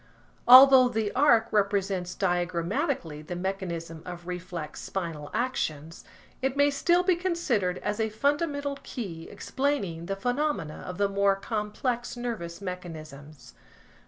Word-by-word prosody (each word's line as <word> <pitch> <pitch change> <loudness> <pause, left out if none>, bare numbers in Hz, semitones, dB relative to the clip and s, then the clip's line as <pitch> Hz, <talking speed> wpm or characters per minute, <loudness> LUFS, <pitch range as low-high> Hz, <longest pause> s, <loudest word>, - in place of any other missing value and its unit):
Although 255 0 +9
the 220 -3 -1
arc 235 -5 +3
represents 195 -3 0
diagrammatically 175 - -1
the 165 +4 -6
mechanism 175 -3 -4
of 175 -1 -8
reflex 175 -3 -6
spinal 165 -6 -5
actions, 165 - -3 0.4
it 265 +1 -1
may 285 0 +4
still 345 +5 +2
be 365 -1 +3
considered 320 - 0
as 210 +1 -2
a 220 0 +1
fundamental 285 +4 -1
key 175 -10 -6
explaining 200 - -2
the 195 - -2
phenomena 245 - -2
of 180 - -6
the 200 0 +2
more 200 0 +2
complex 225 +4 -3
nervous 215 -8 -5
mechanisms. 155 -7 -8
200 Hz, 125 wpm, -27 LUFS, 170-255 Hz, 0.4 s, Although